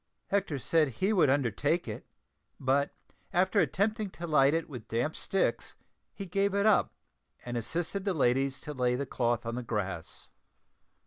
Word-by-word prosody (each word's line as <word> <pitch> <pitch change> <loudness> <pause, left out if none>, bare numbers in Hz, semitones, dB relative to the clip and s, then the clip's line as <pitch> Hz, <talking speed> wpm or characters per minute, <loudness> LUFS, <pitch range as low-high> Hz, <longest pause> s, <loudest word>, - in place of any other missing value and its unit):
Hector 195 -7 0
said 155 +4 +2
he 185 - 0
would 175 -8 +4
undertake 140 - +1
it, 105 - -6 0.5
but 135 +2 +2 0.4
after 190 +3 +2
attempting 200 - +1
to 170 -2 -7
light 150 -2 +4
it 165 - -1
with 125 -6 -9
damp 120 +7 -1
sticks 195 -2 -1 0.4
he 200 - -7
gave 195 +2 0
it 200 +1 +2
up 215 - +3 0.5
and 120 0 -4
assisted 170 - -2
the 195 -2 0
ladies 135 0 +2
to 150 - -6
lay 125 -2 +1
the 140 +3 -2
cloth 120 -2 -1
on 115 - -3
the 125 - -3
grass. 95 -8 -4
145 Hz, 165 wpm, -30 LUFS, 125-190 Hz, 0.5 s, would